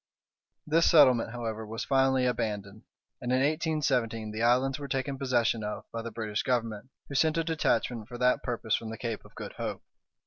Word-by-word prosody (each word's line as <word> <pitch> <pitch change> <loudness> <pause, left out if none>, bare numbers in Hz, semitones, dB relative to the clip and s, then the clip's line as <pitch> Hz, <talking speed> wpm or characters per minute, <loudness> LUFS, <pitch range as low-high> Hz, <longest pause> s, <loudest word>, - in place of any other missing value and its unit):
This 165 +2 +4
settlement, 130 -8 +6
however, 115 -2 -4
was 110 0 -5
finally 135 -1 +3
abandoned, 105 -4 -2 0.4
and 125 - -2
in 130 - +4
1817 135 -7 0
the 110 +1 -4
islands 130 +4 +3
were 140 - -5
taken 135 0 -2
possession 120 -4 +1
of 105 0 -4
by 115 - -3
the 115 - -5
British 110 -2 -3
Government, 115 -2 -1 0.2
who - - -8
sent 160 +3 +2
a 165 - +2
detachment 120 -8 0
for 120 -1 -8
that 125 +1 +3
purpose 115 -2 -2
from 115 - 0
the 115 - -6
Cape 115 -3 -4
of - - -18
Good - - -7
Hope. - - -4
120 Hz, 185 wpm, -29 LUFS, 110-135 Hz, 0.4 s, settlement